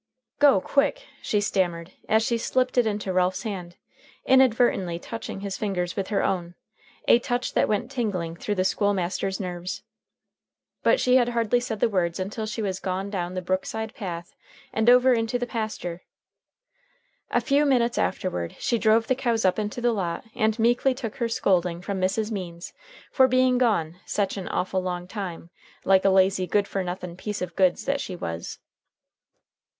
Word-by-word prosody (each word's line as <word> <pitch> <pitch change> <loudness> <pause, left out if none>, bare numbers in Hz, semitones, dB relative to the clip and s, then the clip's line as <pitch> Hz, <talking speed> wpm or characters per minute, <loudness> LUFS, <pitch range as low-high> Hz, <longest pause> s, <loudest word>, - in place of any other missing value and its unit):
"Go 290 -1 +6
quick!" 295 - 0 0.2
she 210 - 0
stammered 180 -4 -1 0.2
as 220 +1 +4
she 235 0 0
slipped 255 +2 0
it 235 - +3
Into 205 -3 -2
Ralph's 185 +2 +1
hand, 180 -6 -6 0.5
inadvertently 240 -9 +3
touching 210 +1 -7
his 200 -1 -4
fingers 180 -4 -2
with 195 -2 -2
her 205 - 0
own 175 -2 -1 0.5
a 235 - +7
touch 245 0 -2
that - - +3
went 215 +4 -1
tingling 195 -10 -2
through 205 +4 -3
the 185 -1 +1
school 205 +1 +1
master's 190 +1 -2
nerves. 180 -1 -5 1.0
But - - +3
she 250 0 +4
had 245 -1 +3
hardly 235 0 +1
said 240 -4 -4
the - - +5
words 180 -5 -1
until 210 +4 -3
she 220 +1 -3
was 190 -2 -2
gone 190 +1 -3
down 180 -2 -3
the 185 - -3
brookside 200 +4 -2
path 175 -8 -6 0.4
and 220 +2 +3
over 250 +1 +6
into 230 +1 0
the 245 - -2
pasture. 215 -7 -4 1.3
A - - +2
few 285 +1 +2
minutes 245 -4 +2
afterward 85 - -2
she 240 -4 0
drove 220 +1 +4
the 260 - +2
cows 235 -5 0
up 185 +3 +2
into 210 +3 -3
the 240 -1 +2
lot 180 -4 -3
and 220 0 +1
meekly 240 +3 +2
took 230 -4 -6
her 235 -1 -1
scolding 180 -6 +1
from 190 +1 -4
Mrs. 210 +4 0
Means 175 -4 -6 0.4
for 260 -1 +5
being 255 0 +3
gone 180 -9 +1
sech 200 -2 -1
an 195 -2 -5
awful 185 +1 -1
long 180 -1 -4
time, 180 -4 -6 0.3
like 190 -1 +5
a 195 - +5
lazy, 190 -1 +3
good 200 +3 +1
fer 195 - -2
nothin 180 -1 -5
piece 210 +2 -4
of 180 - -5
goods 185 -2 +2
that 280 0 0
she 185 - -5
was. 85 - -5
205 Hz, 175 wpm, -25 LUFS, 185-235 Hz, 1.3 s, a